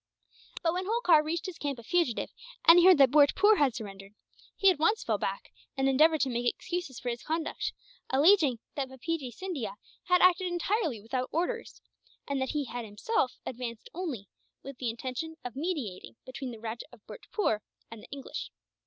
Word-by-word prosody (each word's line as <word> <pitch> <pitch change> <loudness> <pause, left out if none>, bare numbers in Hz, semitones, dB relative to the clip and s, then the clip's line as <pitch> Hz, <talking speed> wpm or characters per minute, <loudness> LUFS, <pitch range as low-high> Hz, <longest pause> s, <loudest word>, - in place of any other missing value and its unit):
But 330 -1 +2
when 370 +1 -2
Holkar 405 -9 +4
reached 325 +2 -2
his 370 -3 -6
camp 285 -2 -2
a 235 - -11
fugitive, 330 -3 0 0.3
and 335 +1 +9
he 350 - +5
heard 370 -3 +8
that 270 -3 +6
Bhurtpoor 375 +9 +5
had 270 -5 +3
surrendered, 195 -2 -8 0.4
he 390 -2 +6
at 335 - -3
once 420 +8 +2
fell - - 0
back; - - -4 0.2
and 270 0 +2
endeavoured 310 +4 +4
to 270 - +2
make 240 0 +1
excuses 345 -8 -5
for 245 - -3
his 235 0 -4
conduct, 320 0 -2 0.4
alleging 290 - +5 0.2
that 275 -3 -3
Bapeejee 265 +1 -3
Scindia 245 - -5 0.3
has 360 0 +4
acted 365 +1 +5
entirely 350 - -1
without 250 +5 -3
orders, 360 +8 -2 0.5
and 280 -1 -1
that 265 - -1
he 295 -2 -1
had 245 -1 -5
himself 255 - -1
advanced 235 -2 -6
only 300 - -4 0.4
with 275 -2 -9
the 245 - -1
intention 255 +7 -5
of 245 -1 -5
mediating 265 - -4
between 255 0 -6
the 235 - -8
Rajah 225 +1 -6
of 210 - -17
Bhurtpoor 300 - -2 0.3
and 230 -2 -9
the - - -14
English. 275 -1 -6
280 Hz, 180 wpm, -29 LUFS, 245-350 Hz, 0.5 s, and